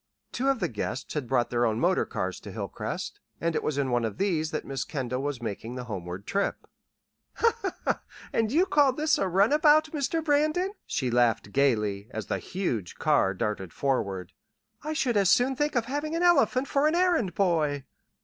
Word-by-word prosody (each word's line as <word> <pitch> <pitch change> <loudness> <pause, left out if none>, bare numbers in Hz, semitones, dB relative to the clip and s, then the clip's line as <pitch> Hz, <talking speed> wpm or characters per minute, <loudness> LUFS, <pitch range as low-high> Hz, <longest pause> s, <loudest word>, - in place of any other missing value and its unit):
Two 265 - -1
of 270 -3 +1
the - - 0
guests 105 +2 -4
had 145 -5 -3
brought 120 -1 +1
their 120 0 +1
own 110 -1 +1
motor - - +2
cars - - -3
to - - -9
Hilcrest, - - -5 0.2
and 170 0 0
it - - +1
was 150 - -2
in 135 -2 0
one 120 -1 +1
of 110 -3 -3
these 165 -6 0
that 155 - -4
Miss 135 -1 -3
Kendall 130 -3 -3
was 140 -4 -3
making 115 +2 -5
the 125 - -5
homeward 95 -4 -6
trip. 200 0 -1 1.7
"And 225 -1 +1
you 335 +7 +4
call 285 -7 +4
this 305 +4 +1
a 195 - +1
'runabout,' 295 - +4
Mr. 310 +2 -1
Brandon?" 310 +6 +2 0.2
she 130 -4 -1
laughed 115 -4 +2
gaily, 105 -7 +1
as 110 -4 -5
the - - -2
huge 125 - -3
car 145 -11 +2
darted 105 -4 -3
forward. 100 -10 -1 0.5
"I 310 +1 -2
should 250 -7 +1
as 195 -2 +4
soon 255 +5 +4
think 295 +1 -1
of 235 -2 +1
having 290 +5 -3
an 340 - 0
elephant 300 -6 +4
for 280 +2 +2
an 310 - +2
errand 340 - +2
boy." 155 -7 +1
155 Hz, 190 wpm, -27 LUFS, -, 1.7 s, you